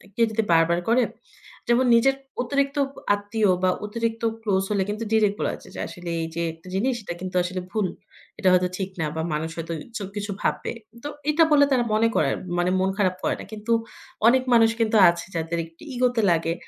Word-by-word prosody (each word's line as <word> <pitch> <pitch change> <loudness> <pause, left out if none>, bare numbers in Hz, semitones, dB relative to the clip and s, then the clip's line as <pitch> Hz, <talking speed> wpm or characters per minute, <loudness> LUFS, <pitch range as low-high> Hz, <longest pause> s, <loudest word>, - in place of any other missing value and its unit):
কেউ 230 - +4
যদি 220 0 0
বারবার 165 +1 +4
করে 245 +1 +4 0.6
যেমন 240 +2 +3
নিজের 270 +4 +4 0.3
অতিরিক্ত 280 +3 0 0.4
আত্মীয় 205 +1 0
বা 185 - +4 0.2
অতিরিক্ত 230 +1 -3 0.2
ক্লোজ 195 -3 +1
হলে 200 -2 +2
কিন্তু 215 +2 -3
ডিরেক্ট 210 -2 +3
বলা - - 0
যায় - - -14
যে - - -6
আসলে 175 -1 -8
এই 165 - -2
যে 170 - -1
একটা 165 +3 -18
জিনিস 245 +6 +1
এটা 175 - -4
কিন্তু 185 0 -5
আসলে 185 +1 -3
ভুল। 215 -4 0 0.5
এটা 190 - +1
হয়তো 180 0 +4
ঠিক 190 -1 -3
না - - +1
বা 160 - -1
মানুষ 160 +2 -2
হয়তো 165 0 -4 0.2
এসব 205 -4 -4
কিছু 205 0 -3
ভাববে। - - -1 0.3
তো - - -3 0.2
এটা 305 +2 +5
বলে 285 -1 +6
তারা 250 -2 +3
মনে 220 +1 +4
করে, 145 - +3 0.3
মানে 175 +1 +2
মন 190 +1 +2
খারাপ 185 -3 +2
করে - - +1
না। - - -6
কিন্তু 215 +2 -5 0.6
অনেক 255 +2 +5
মানুষ 225 -1 +6
কিন্তু 225 -1 +2
আছে 170 0 -3
যাদের 165 +1 -2
একটু 165 0 -21
ইগো 250 0 +3
তে 225 - +2
লাগে। 165 0 +1
205 Hz, 205 wpm, -24 LUFS, 180-230 Hz, 0.6 s, বলে